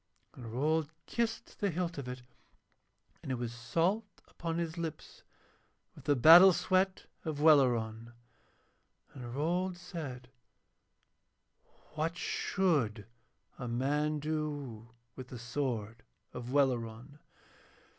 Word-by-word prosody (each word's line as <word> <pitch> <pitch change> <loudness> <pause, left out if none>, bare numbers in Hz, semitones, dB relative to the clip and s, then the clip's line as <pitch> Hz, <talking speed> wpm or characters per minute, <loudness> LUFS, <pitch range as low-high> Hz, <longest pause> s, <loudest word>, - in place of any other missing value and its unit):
And 115 -3 -9
Rold 150 +5 +1 0.2
kissed 230 -1 -3
the 205 - +1
hilt 170 -2 -2
of 135 - -6
it, 125 0 -6 1.0
and - - -5
it - - 0
was 120 -1 -4
salt 170 - -1
upon 165 0 -4
his 170 -1 -2
lips 165 -3 -6 0.7
with 140 - -15
the 145 -1 +3
battle 170 +8 +9
sweat 185 +2 +1 0.2
of 155 -3 -3
Welleran. 120 -7 +3 1.0
And 120 -2 -8
Rold 175 +5 0
said: 145 -9 -7 1.6
'What 160 +3 -2
should 140 - 0 0.5
a 125 - -4
man 145 +5 0
do 145 -7 -4 0.3
with 130 -1 -8
the 125 - -8
sword 115 -3 -3 0.3
of 125 0 -6
Welleran?' 130 0 0
145 Hz, 110 wpm, -32 LUFS, 120-165 Hz, 1.6 s, battle